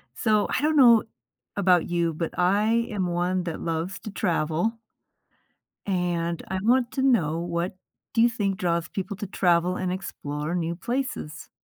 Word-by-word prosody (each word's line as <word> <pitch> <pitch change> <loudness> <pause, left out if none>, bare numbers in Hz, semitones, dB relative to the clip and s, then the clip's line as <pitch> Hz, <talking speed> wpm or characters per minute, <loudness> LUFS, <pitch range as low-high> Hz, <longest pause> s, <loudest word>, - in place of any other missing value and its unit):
So 215 -2 +2
I - - 0
don't 310 +1 +2
know 240 -6 +7 0.5
about 180 -4 +3
you, 170 -1 0
but 165 +1 -4
I 210 +6 +2
am 195 -4 -1
one 175 +1 0
that 170 -2 -4
loves 165 +3 -3
to 215 - -8
travel 175 +4 0 1.1
and 175 -3 -1
I 190 0 -1
want 245 +2 +3
to 265 - -1
know 170 - +2
what 170 +2 -2 0.4
do 225 - +3
you 235 - +6
think 200 -4 -1
draws 170 -2 0
people 195 +1 -4
to 205 - -5
travel 180 -1 +2
and 185 -1 -2
explore 150 -4 -4
new 170 -1 -1
places? 240 - -4
185 Hz, 160 wpm, -25 LUFS, 170-215 Hz, 1.1 s, know